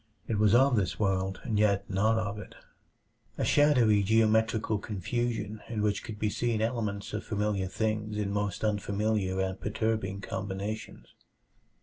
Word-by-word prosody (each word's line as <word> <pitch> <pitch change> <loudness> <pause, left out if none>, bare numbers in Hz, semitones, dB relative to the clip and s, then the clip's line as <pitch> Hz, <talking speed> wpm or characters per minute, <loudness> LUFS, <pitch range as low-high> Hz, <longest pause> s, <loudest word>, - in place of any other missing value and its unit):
It 110 -3 -1
was 105 +1 +5
of 130 -1 +5
this 95 -5 0
world, 95 -2 0
and 110 -4 -1
yet 100 -2 +2
not 105 +4 +2
of 105 -1 -2
it - - -10 0.8
a - - 0
shadowy 125 -8 +4
geometrical 110 +1 +2
confusion 110 +1 -3
in 110 -3 -2
which 105 -1 0
could 110 -3 -7
be 105 - 0
seen 120 -1 0
elements 110 -3 -2
of 105 - -3
familiar 105 -2 -1
things 110 +1 -2
in 100 -1 -1
most 105 0 -2
unfamiliar 105 -2 0
and 95 0 -2
perturbing 105 -2 -1
combinations. 100 +2 -5
105 Hz, 145 wpm, -29 LUFS, 100-110 Hz, 0.8 s, was